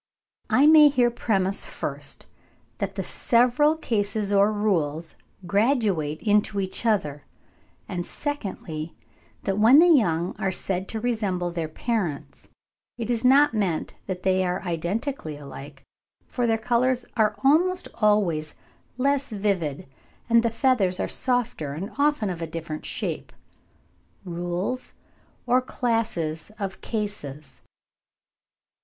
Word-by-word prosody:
I 275 - +5
may 305 -1 +8
here 245 -3 +2
premise, 195 -5 0
first, - - -6 0.5
that - - -3
the - - -2
several 250 +6 +3
cases 205 -7 -1
or 200 +1 +4
rules 170 -7 -1 0.3
graduate 200 - +1
into 210 -1 +2
each 195 +4 -2
other; 150 -10 0 0.6
and 175 -1 -3
secondly, 180 - -5 0.5
that 195 +1 -1
when 230 +6 +7
the 330 - +8
young 175 - +1
are 190 - 0
said 190 0 -2
to 225 - -4
resemble 205 -7 -1
their 165 -2 -3
parents, 175 -3 -3 0.5
it 235 0 -3
is 235 0 -1
not 280 +3 +5
meant 195 -7 -1
that 185 -2 -4
they 190 0 +2
are 180 0 -2
identically 175 - -3
alike, 140 0 -10 0.4
for 245 -2 -1
their 225 -1 +2
colours 245 +2 +1
are 215 -2 +2
almost 355 +7 +3
always 180 -8 +2 0.4
less 280 +1 +1
vivid, 195 - -1 0.4
and 230 -1 +5
the 230 - +1
feathers 225 -6 +1
are - - 0
softer 245 - -1
and 190 +9 -5
often 285 -9 +2
of 170 -2 -6
a 165 - -3
different 160 -1 -6
shape. - - -4 0.9
RULES 175 +8 -3 0.5
OR 250 +1 +3
CLASSES 220 -12 -2
OF 195 -1 -5
CASES. 205 - -5
205 Hz, 125 wpm, -25 LUFS, 175-240 Hz, 0.9 s, may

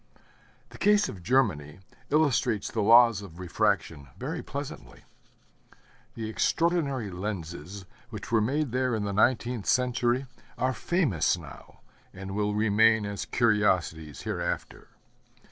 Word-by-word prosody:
The - - -14
case 210 0 +4
of 95 - -9
Germany 90 - +1 0.3
illustrates 130 -8 +1
the 110 - -1
laws 115 0 +6
of 90 -5 -11
refraction 80 -4 -1
very - - -4
pleasantly. - - -8 1.1
The 110 -1 -4
extraordinary 140 - 0
lenses 90 -1 -6 0.2
which 110 -1 -8
were 115 -2 +3
made 140 +4 0
there 125 -1 0
in 110 - -2
the 100 -1 -3
nineteenth 120 0 +1
century 125 0 +1 0.3
are 130 0 0
famous 120 - +1
now, 70 -6 -13 0.3
and 95 +1 -7
will 105 +1 -1
remain 110 +1 +3
as 100 0 -4
curiosities 95 - 0
hereafter. - - -4
110 Hz, 120 wpm, -27 LUFS, 95-125 Hz, 1.1 s, laws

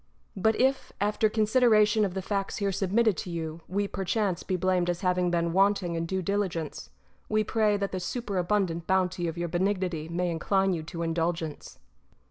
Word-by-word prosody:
But 220 +3 +1
if, 265 +1 +1
after 210 +2 +2
consideration 215 -1 +4
of 195 -2 -1
the 190 - -3
facts 195 0 -2
here 200 -1 0
submitted 200 +3 +2
to 180 - -5
you, 165 -1 -5
we 200 +2 -1
perchance 195 -1 -1
be 185 - -2
blamed 180 -1 +1
as 175 0 -2
having 180 -1 +1
been 170 -1 0
wanting 195 -2 +2
in 165 0 -2
due 190 +1 -2
diligence, 180 -5 -2 0.4
we 215 0 +2
pray 215 -1 +2
that 200 -1 -2
the 185 - -3
superabundant 185 -4 -1
bounty 185 -2 +1
of 165 +1 -4
your 170 0 -2
Benignity 180 -2 -1
may 175 +1 -1
incline 190 +3 +1
you 165 - -2
to 170 +2 -5
indulgence. 165 -1 -2
185 Hz, 175 wpm, -28 LUFS, 170-205 Hz, 0.4 s, consideration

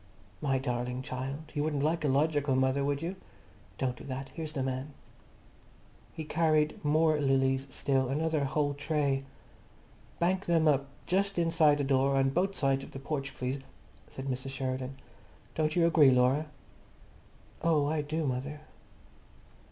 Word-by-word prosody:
"My 135 -3 +1
darling 125 -1 -2
child, 135 +3 -5
you 145 -1 0
wouldn't 150 -2 -1
like 160 +2 +1
a - - +2
logical 145 0 +2
mother, 130 +1 +2
would 145 +2 -1
you? 180 +3 -3 0.6
Don't 130 -2 -1
do - - -12
that. 135 0 -5
Here's 155 -2 -6
the 135 -4 -1
man." 135 +2 -4 1.2
He 160 - -6
carried 155 -1 +1
more 155 +1 +3
lilies 135 0 +2
still, 135 -1 0
another 155 +1 0
whole 145 +1 0
tray. 145 -2 0 0.9
"Bank 185 +3 0
them 165 -2 +3
up, 140 -2 +3 0.2
just 195 +1 0
inside 165 -3 +4
the 145 - 0
door, 135 0 +2
on 135 0 +3
both 190 +6 0
sides 135 -3 +1
of - - -11
the 135 - -6
porch, 140 0 -4
please," 130 +2 -2 0.5
said 135 - -7
Mrs. 130 0 -3
Sheridan. 130 0 -3 0.6
"Don't 155 -1 0
you 170 -1 +4
agree, 160 -4 +6
Laura?" 130 +4 +3 1.1
"Oh, 155 -3 +3
I 150 +1 0
do, 155 +2 -2
mother." 140 +3 -3
145 Hz, 150 wpm, -30 LUFS, 135-155 Hz, 1.2 s, agree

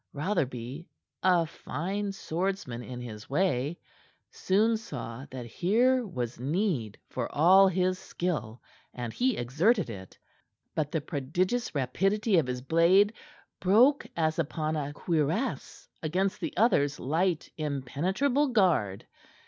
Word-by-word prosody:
Rotherby, 140 - -2 0.3
a 180 -3 +4
fine 195 +6 -4
swordsman 185 -8 -3
in 125 0 -7
his 110 -3 -9
way, 150 -1 0 0.5
soon 215 +4 +2
saw 135 - -7
that 130 -2 -7
here 230 - +2
was 125 - -4
need 140 - -1
for - - -4
all 185 +6 +6
his 185 0 +1
skill, 150 -10 -4 0.3
and 120 -2 -5
he 255 -1 +1
exerted 160 - +1
it. 95 -3 -10 0.6
But 150 -2 -1
the 160 -3 -1
prodigious 175 - -1
rapidity 195 - +2
of 145 - -1
his 125 0 -4
blade 180 - +4 0.5
broke 240 +10 +4
as 160 0 +1
upon 155 0 -1
a 145 -2 -2
cuirass 165 - -2
against 185 +5 0
the - - -4
other's 150 - +3
light, 165 +4 0
impenetrable 170 - 0
guard. 175 - +2
165 Hz, 120 wpm, -29 LUFS, 135-195 Hz, 0.6 s, all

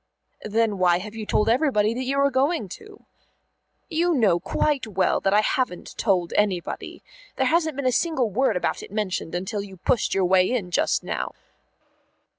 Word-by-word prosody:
"Then 215 -1 0
why 175 -1 +4
have 205 +4 -7
you 220 -2 -7
told 210 - +1
everybody 230 -4 +2
that 255 +2 -4
you 275 +2 -1
are 280 0 +3
going 270 - +1
to?" 420 - -12 0.8
"You 340 +1 +1
know 200 -9 +3
quite 275 - -1
well 190 -3 +1
I 200 +2 +4
haven't 215 -4 -2
told 185 -6 0
anybody. 195 -5 -2 0.3
There - - +1
hasn't 320 -3 +1
been 280 -1 -4
a 255 - +3
single 260 -5 0
word 235 -2 +1
about - - -2
it - - -10
mentioned 190 -5 -3
until 190 +3 -3
you 195 -2 -10
pushed 215 +6 0
your 190 -1 +2
way 185 0 +4
in 210 -8 -2
just - - +1
now." - - -3
215 Hz, 175 wpm, -24 LUFS, 190-265 Hz, 0.8 s, why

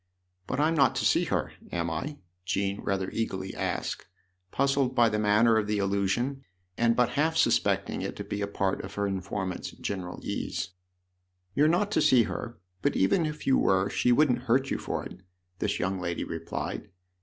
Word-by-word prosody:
" 90 0 -45
But - - -2
I'm 155 +2 +3
not 145 -4 +4
to - - 0
see - - +4
her> - - -1 0.2
am 85 -1 -1
I? 145 - -4 0.2
" 90 0 -48
Jean 100 +2 -1
rather 95 -2 -1
eagerly 95 -4 -3
asked, - - -3 0.4
puzzled 135 +1 +1
by 120 -2 +5
the 105 0 -1
manner 105 +2 +4
of 105 -2 0
the 105 0 0
allu 100 0 +1
sion 135 +6 -1 0.3
and 115 +1 +3
but 125 0 +3
half 155 +6 +1
suspecting - - +2
it - - -4
to - - -5
be 105 - -4
a 100 - 0
part 100 -1 -1
of 95 +1 -8
her 100 - 0
informant's 95 -1 -3
general 95 -3 -5
ease* - - -3 0.4
" 90 0 -47
You're 150 +2 +5
not 180 +6 +2
to - - +2
see 130 -5 +6
her, 120 +1 -5 0.2
but - - +1
even 160 - +3
if 150 0 -6
you 135 - +4
were 95 +1 +2
she 125 - +2
wouldn't 125 -2 +3
hurt 135 +3 +3
you - - 0
for - - -3
it," 90 - -9 0.4
this 100 - 0
young 95 +1 -1
lady 85 -1 -2
replied. - - -5
105 Hz, 200 wpm, -28 LUFS, 95-130 Hz, 0.4 s, see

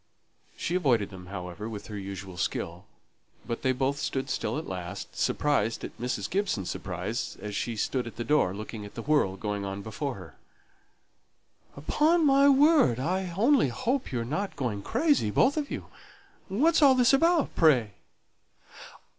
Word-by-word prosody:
She 170 - -3
avoided 125 - +2
them, 90 -1 -10
however, 90 +2 -6
with 105 -2 -7
her 105 - -8
usual 95 -2 -7
skill; 85 +1 -3 0.6
but 115 - -4
they 130 - +2
both 135 +2 -1
stood 135 -2 -2
still - - -2
at 155 - -4
last, 90 +1 -6
surprised 130 -7 0
at - - -7
Mrs. 120 -5 -2
Gibson's 185 - -1
surprise, 100 +6 -4
as 105 -1 -6
she 115 +2 -2
stood 125 +3 -1
at 115 - -9
the 120 - -4
door, 125 -7 +2
looking 110 +1 -7
at 105 - -11
the 115 - -5
whirl 145 -11 +2
going 105 0 -3
on 100 0 -5
before 125 +5 -4
her. 90 -6 -11 1.4
"Upon 310 - +2
my 275 0 +6
word, 280 - +5
I 180 +5 -1
only 250 - +4
hope 245 - -2
you 125 - -1
are - - -4
not 190 +11 -3
going 115 -7 -2
crazy, 290 - +1
both 260 - +3
of 300 -2 -2
you! - - -5 0.6
What's 315 - +3
all 275 -3 +7
this 255 +1 +4
about, 330 +3 +3
pray?" 130 -10 +4
125 Hz, 165 wpm, -28 LUFS, -, 1.4 s, all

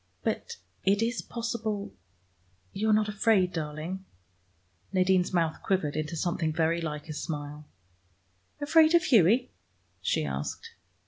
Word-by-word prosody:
But 470 0 -2 0.3
it 200 +3 +3
is 235 +2 -1
possible 225 -3 -3 0.8
you 215 +2 0
are - - +5
not 210 0 +3
afraid, 205 -3 +2
darling?" 160 +4 -4 0.9
Nadine's 185 -1 +3
mouth 165 -3 0
quivered 175 -7 0
into 155 +1 -2
something 165 -1 0
very 165 +1 +1
like 150 -2 -4
a 155 - -5
smile. 150 -1 -5 0.9
"Afraid 315 +3 +5
of 340 - +5
Hughie?" 235 - +4 0.5
she 80 -3 0
asked. 70 0 -4
185 Hz, 125 wpm, -28 LUFS, 155-220 Hz, 0.9 s, are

